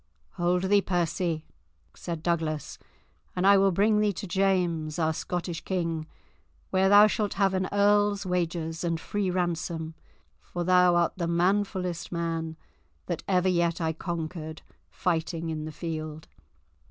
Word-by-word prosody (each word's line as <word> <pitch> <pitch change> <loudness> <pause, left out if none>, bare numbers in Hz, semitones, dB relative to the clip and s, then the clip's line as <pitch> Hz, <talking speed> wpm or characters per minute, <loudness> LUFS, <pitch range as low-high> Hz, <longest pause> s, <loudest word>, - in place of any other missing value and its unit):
"Hold 180 - 0
thee, 200 +1 +4
Percy," 170 -3 -1 0.5
said 165 -2 -6
Douglas, 160 -3 -2 0.6
"and 180 +1 0
I 200 +1 +8
will 195 0 +4
bring 210 +4 +3
thee 210 -1 +3
to 200 - -6
James, 175 -5 0
our 160 -1 +1
Scottish 175 0 -4
king, 165 -4 -2 0.6
where 190 0 +3
thou 205 +1 +9
shalt 215 -1 0
have 195 -1 +2
an 185 0 0
earl's 205 0 +3
wages 170 -2 -2
and 165 -1 -1
free 205 +1 -2
ransom, 170 -2 -2 0.5
for 175 - -5
thou 180 0 +5
art 170 -1 +2
the 170 -2 -1
manfullest 180 0 0
man 165 -2 -3 0.5
that - - -3
ever 185 -1 +2
yet 170 -1 +1
I 160 -1 0
conquered 160 -1 -5 0.3
fighting 165 -1 -2
in 155 -1 -4
the 155 - -5
field." 155 -1 -5
175 Hz, 140 wpm, -27 LUFS, 165-190 Hz, 0.6 s, thou